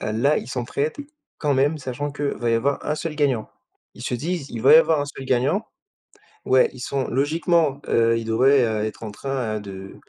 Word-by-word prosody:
là, 120 Hz, +8 st, +1 dB
ils 120 Hz, -, -8 dB
s'entraident 135 Hz, -, -3 dB, 0.4 s
quand 145 Hz, -3 st, +1 dB
même 145 Hz, +4 st, +2 dB
sachant 135 Hz, +2 st, -4 dB
qu'il 145 Hz, 0 st, -3 dB
va 120 Hz, -1 st, -1 dB
y 115 Hz, -, +3 dB
avoir 135 Hz, +5 st, 0 dB
1 150 Hz, -, 0 dB
seul 155 Hz, 0 st, -5 dB
gagnant. 135 Hz, -7 st, 0 dB, 0.4 s
Ils -, -, -11 dB
se -, -, -2 dB
disent: 155 Hz, +3 st, -3 dB
«Il 115 Hz, -2 st, -6 dB
va -, -, +7 dB
y -, -, +11 dB
avoir 165 Hz, -11 st, +4 dB
1 145 Hz, -, -1 dB
seul 140 Hz, -2 st, -8 dB
gagnant» 135 Hz, -, +1 dB, 0.8 s
ouais, 130 Hz, 0 st, +4 dB
ils 130 Hz, -, -12 dB
sont 135 Hz, +1 st, -2 dB
logiquement, 150 Hz, +1 st, +1 dB
heu, 115 Hz, 0 st, +3 dB
ils 115 Hz, -, -4 dB
devraient, 130 Hz, +4 st, +4 dB
heu, 110 Hz, -2 st, 0 dB
être 110 Hz, +1 st, -6 dB
en 110 Hz, -, -5 dB
train, 125 Hz, -2 st, -3 dB
heu, -, -, -4 dB
de 95 Hz, -1 st, -9 dB
135 Hz, 215 wpm, -23 LUFS, 115-145 Hz, 0.8 s, y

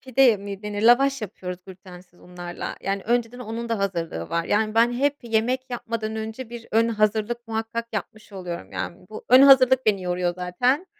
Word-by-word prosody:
pide 260 Hz, -3 st, +4 dB
mi 200 Hz, 0 st, -8 dB
denir 210 Hz, 0 st, -4 dB
lavaş 270 Hz, +3 st, +4 dB
yapıyoruz 180 Hz, -3 st, -6 dB
glütensiz 180 Hz, -1 st, -14 dB
unlarla, 175 Hz, -1 st, -7 dB
yani, 195 Hz, 0 st, -2 dB
önceden 240 Hz, +1 st, 0 dB
onun 235 Hz, 0 st, -5 dB
da 230 Hz, -2 st, -1 dB
hazırlığı 170 Hz, -, -3 dB
var, 170 Hz, 0 st, 0 dB
yani, 215 Hz, +3 st, 0 dB
ben 230 Hz, +1 st, +4 dB
hep 280 Hz, +4 st, +1 dB
yemek 245 Hz, +3 st, -1 dB
yapmadan 225 Hz, -2 st, -4 dB
önce 220 Hz, +2 st, -6 dB
bir 235 Hz, -1 st, -9 dB
ön 225 Hz, +1 st, +3 dB
hazırlık 220 Hz, +2 st, 0 dB
muhakkak 225 Hz, +1 st, -3 dB
yapmış 215 Hz, 0 st, -6 dB
oluyorum, 180 Hz, -3 st, -7 dB
yani, 180 Hz, +1 st, -6 dB
bu 215 Hz, -, -9 dB
ön 255 Hz, +2 st, +8 dB
hazırlık 260 Hz, -2 st, +6 dB
beni 200 Hz, -3 st, +2 dB
yoruyor 180 Hz, -1 st, -1 dB
zaten. 245 Hz, -, 0 dB
220 Hz, 175 wpm, -24 LUFS, 190-240 Hz, -, ön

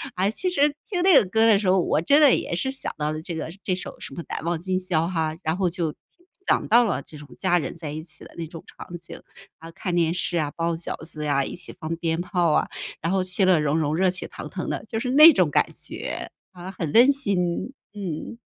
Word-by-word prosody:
啊， 190 Hz, +2 st, +1 dB
其 365 Hz, -, 0 dB
实 290 Hz, -5 st, +3 dB, 0.2 s
听 365 Hz, -4 st, -1 dB
那 375 Hz, -3 st, +6 dB
个 -, -, +5 dB
歌 220 Hz, +4 st, +3 dB
的 215 Hz, -, +6 dB
时 200 Hz, -1 st, -2 dB
候， 190 Hz, -, +4 dB
我 170 Hz, -, +1 dB
真 285 Hz, -, +4 dB
的 285 Hz, -4 st, +7 dB
也 -, -, -3 dB
是 225 Hz, +10 st, -1 dB
想 270 Hz, 0 st, -4 dB
到 150 Hz, 0 st, -1 dB
了 155 Hz, -, -4 dB
这 170 Hz, -, -6 dB
个 160 Hz, 0 st, -4 dB
这 185 Hz, -, 0 dB
首 185 Hz, -, -5 dB
什 -, -, -8 dB
么 170 Hz, -, -6 dB
难 -, -, -4 dB
忘 170 Hz, 0 st, -1 dB
今 185 Hz, +1 st, -1 dB
宵 170 Hz, -3 st, 0 dB
哈， 160 Hz, -3 st, -1 dB
然 160 Hz, +2 st, 0 dB
后 190 Hz, -2 st, +1 dB
就 170 Hz, -3 st, -2 dB, 0.5 s
想 -, -, +2 dB
到 235 Hz, +2 st, +6 dB
了 210 Hz, -10 st, -1 dB
这 150 Hz, -, -13 dB
种 145 Hz, 0 st, -12 dB
家 180 Hz, -2 st, +2 dB
人 -, -, -5 dB
在 160 Hz, -3 st, -6 dB
一 155 Hz, +1 st, -6 dB
起 160 Hz, -2 st, -8 dB
的 -, -, -14 dB
那 165 Hz, -, -5 dB
种 165 Hz, 0 st, -10 dB
场 175 Hz, -1 st, -9 dB
景， 170 Hz, -, -10 dB, 0.4 s
啊， 165 Hz, -, -10 dB
看 175 Hz, +2 st, -4 dB
电 165 Hz, -1 st, +2 dB
视 175 Hz, -1 st, -1 dB
啊、 150 Hz, -2 st, -1 dB
包 170 Hz, 0 st, -1 dB
饺 165 Hz, +1 st, -4 dB
子 155 Hz, -2 st, -6 dB
呀、 140 Hz, -2 st, +1 dB
一 -, -, -6 dB
起 180 Hz, -, -4 dB
放 165 Hz, -1 st, -3 dB
鞭 165 Hz, -1 st, -1 dB
炮 175 Hz, -2 st, +1 dB
啊， -, -, +2 dB, 0.3 s
然 165 Hz, +3 st, -1 dB
后 190 Hz, -1 st, +2 dB
其 185 Hz, +1 st, +1 dB
乐 185 Hz, -4 st, +4 dB
融 150 Hz, +1 st, +1 dB
融、 155 Hz, -1 st, 0 dB
热 185 Hz, +2 st, +3 dB
气 185 Hz, -, 0 dB
腾 -, -, -9 dB
腾 -, -, -5 dB
的， -, -, -3 dB
就 225 Hz, -, -2 dB
是 250 Hz, +1 st, -2 dB
那 305 Hz, +4 st, +10 dB
种 180 Hz, -, +3 dB
感 -, -, +2 dB
觉， -, -, -5 dB, 0.2 s
啊， 180 Hz, 0 st, -9 dB
很 165 Hz, -5 st, -4 dB
温 250 Hz, +5 st, +7 dB
馨， 200 Hz, -6 st, 0 dB, 0.2 s
嗯。 195 Hz, +2 st, -6 dB
175 Hz, 270 characters per minute, -24 LUFS, 160-195 Hz, 0.5 s, 那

